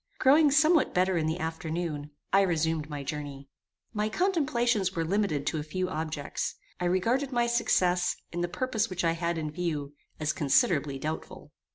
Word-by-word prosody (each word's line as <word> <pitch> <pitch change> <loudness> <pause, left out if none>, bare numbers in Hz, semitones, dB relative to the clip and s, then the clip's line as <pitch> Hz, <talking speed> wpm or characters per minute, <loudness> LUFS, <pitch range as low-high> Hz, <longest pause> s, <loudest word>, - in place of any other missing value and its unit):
Growing 290 +3 +5
somewhat 310 +2 +4
better 185 +1 +3
in 160 -2 +1
the 160 +2 -1
afternoon, 160 -2 -3 0.2
I 195 - +6
resumed 160 -4 0
my 145 -2 -5
journey. 140 -1 -6 0.4
My 210 0 0
contemplations 240 - +1
were 165 -1 0
limited 170 -6 0
to 160 - -1
a - - -3
few 185 +4 -3
objects. 155 -4 -3 0.2
I 180 - -1
regarded 230 +10 +1
my 240 -1 +2
success, 180 -7 +2 0.2
in 175 - -3
the 175 - 0
purpose 225 +3 -1
which 185 -1 -3
I 165 - +3
had 170 0 -1
in 155 -2 -3
view, 150 -4 -3 0.3
as 155 0 0
considerably 145 - +2
doubtful. 155 +3 -6
175 Hz, 170 wpm, -28 LUFS, 155-215 Hz, 0.4 s, I